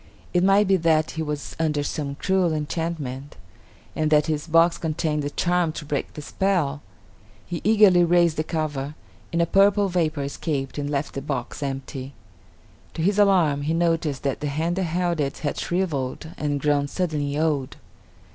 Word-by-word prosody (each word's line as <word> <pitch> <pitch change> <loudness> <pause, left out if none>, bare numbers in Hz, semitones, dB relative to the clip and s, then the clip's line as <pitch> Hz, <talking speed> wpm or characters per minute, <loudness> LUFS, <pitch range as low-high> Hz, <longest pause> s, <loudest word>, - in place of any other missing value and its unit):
It 175 0 +3
might 195 +1 +4
be 190 0 +4
that 160 -2 +2
he 160 - -4
was 150 -2 -4
under 150 -3 +1
some 145 -1 -3
cruel 185 +1 +1
enchantment, 150 -3 -4 0.6
and 155 -1 +1
that 150 -1 +5
this 155 0 -2
box 165 +1 +4
contained 155 -1 -1
the 145 - -2
charm 175 +1 +1
to 155 - -7
break 145 -1 -3
the 150 - -7
spell. 155 -6 0 0.6
He 175 -2 -5
eagerly 205 -5 +6
raised 170 -1 +3
the 155 - +1
cover, 150 -3 -3 0.4
and 170 0 +2
a - - +2
purple 200 +2 +4
vapor 160 -5 0
escaped 140 0 -3
and 145 0 -3
left 145 0 -2
the 135 - -4
box 135 -1 -4
empty. 135 -1 -5 0.8
To 160 - -2
his 200 +3 +2
alarm, 175 -8 +4
he 155 +3 0
noticed 165 -4 0
that 135 -2 -1
the 150 - -3
hand 160 +5 -1
that 190 - 0
held 175 0 -1
it 140 -2 -1
had 145 - -1
shriveled 160 -5 -2
and 145 -4 -1
grown 145 0 +1
suddenly 150 -4 -2
old. 150 -4 -1
155 Hz, 175 wpm, -24 LUFS, 145-175 Hz, 0.8 s, eagerly